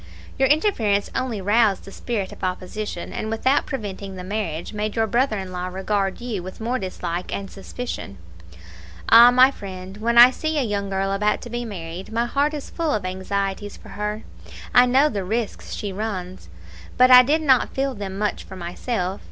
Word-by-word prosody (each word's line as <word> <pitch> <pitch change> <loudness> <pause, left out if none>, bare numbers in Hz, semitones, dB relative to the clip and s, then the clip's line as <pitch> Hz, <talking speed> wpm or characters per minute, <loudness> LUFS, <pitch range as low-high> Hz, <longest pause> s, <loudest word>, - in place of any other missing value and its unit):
Your 265 - +4
interference 250 - +1
only 250 -6 -2
roused 205 0 +2
the 195 - -10
spirit 205 -3 -3
of - - -12
opposition, 185 +1 -4
and 215 - -4
without 260 +6 +1
preventing 200 -6 -5
the 180 - -7
marriage, 185 -3 -4
made 210 0 -3
your 225 -1 +2
brother 235 0 +1
in 190 -1 -6
law 180 0 -4
regard 195 +1 -1
you 235 -6 -4
with 185 +1 -9
more 240 +3 -1
dislike 180 -2 -4
and 195 -1 -5
suspicion. 195 - -7 0.9
Ah! 235 +2 +10
my 255 +2 +6
friend, 190 -4 -9
when 235 +2 0
I 245 +2 +10
see 315 +3 -2
a 285 - +2
young 200 -3 -2
girl 195 0 -1
about 210 +2 +1
to 240 - -9
be 240 0 -3
married, 180 -1 -7
my 230 +1 0
heart 285 +5 0
is 290 - -6
full 330 -2 -2
of 205 - -3
anxieties 195 +2 -3
for - - -15
her 210 +1 -4 0.5
I 250 0 +7
know 265 +4 +4
the 205 -9 -3
risk 220 +3 -2
she 205 -2 -4
runs. 185 - -5 0.5
But 255 +1 +6
I 250 0 +11
did 300 +5 +1
not 265 -4 +3
feel 270 0 0
them 195 -3 -6
much 210 0 -2
for 190 - -11
myself. 185 +2 -3
210 Hz, 190 wpm, -23 LUFS, 190-245 Hz, 0.9 s, I